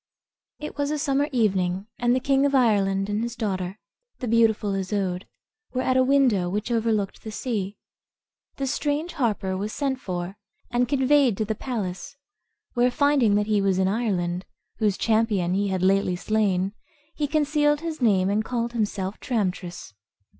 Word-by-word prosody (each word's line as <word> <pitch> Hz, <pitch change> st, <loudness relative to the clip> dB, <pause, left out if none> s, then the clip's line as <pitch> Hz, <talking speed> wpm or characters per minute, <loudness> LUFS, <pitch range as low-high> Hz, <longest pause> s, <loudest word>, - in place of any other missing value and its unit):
It 300 Hz, -, -7 dB
was 285 Hz, 0 st, +1 dB
a 305 Hz, -, -1 dB
summer 285 Hz, -1 st, +1 dB
evening, 190 Hz, -6 st, +1 dB
and 240 Hz, 0 st, +3 dB
the -, -, +2 dB
king 270 Hz, +1 st, +2 dB
of 280 Hz, -, 0 dB
Ireland 200 Hz, -6 st, +3 dB
and 205 Hz, +1 st, -1 dB
his 235 Hz, 0 st, -3 dB
daughter, 190 Hz, -4 st, -3 dB, 0.4 s
the 250 Hz, -, -4 dB
beautiful 220 Hz, -3 st, +3 dB
Isoude, 190 Hz, -1 st, -2 dB, 0.5 s
were 255 Hz, 0 st, 0 dB
at 255 Hz, -, +1 dB
a 260 Hz, -, +5 dB
window 255 Hz, -9 st, +3 dB
which 210 Hz, +5 st, -2 dB
overlooked 220 Hz, -4 st, 0 dB
the 220 Hz, -, -6 dB
sea. 210 Hz, -3 st, -3 dB, 0.8 s
The 275 Hz, -, -2 dB
strange 295 Hz, +5 st, -1 dB
harper 210 Hz, -, -1 dB
was 205 Hz, +3 st, -3 dB
sent 270 Hz, -3 st, -1 dB
for, 180 Hz, -1 st, -5 dB, 0.3 s
and 245 Hz, 0 st, +2 dB
conveyed 265 Hz, -4 st, +3 dB
to 215 Hz, -, 0 dB
the 220 Hz, -, -1 dB
palace, 220 Hz, +1 st, -5 dB, 0.6 s
where, 245 Hz, 0 st, +3 dB
finding 270 Hz, -5 st, +3 dB
that 210 Hz, 0 st, +2 dB
he 210 Hz, -1 st, +2 dB
was 195 Hz, -2 st, +2 dB
in 190 Hz, 0 st, +2 dB
Ireland, 190 Hz, -5 st, -1 dB, 0.3 s
whose 210 Hz, -3 st, +1 dB
champion 215 Hz, -6 st, +1 dB
he 200 Hz, +1 st, +1 dB
had 190 Hz, -2 st, -1 dB
lately 190 Hz, -1 st, +3 dB
slain, 195 Hz, -1 st, 0 dB, 0.4 s
he 295 Hz, -, -1 dB
concealed 295 Hz, 0 st, +2 dB
his 325 Hz, -3 st, -5 dB
name, 195 Hz, -6 st, +3 dB
and 215 Hz, +2 st, +1 dB
called 235 Hz, 0 st, -2 dB
himself 205 Hz, -3 st, -2 dB
Tramtris. 185 Hz, -, -3 dB
220 Hz, 165 wpm, -25 LUFS, 195-255 Hz, 0.8 s, a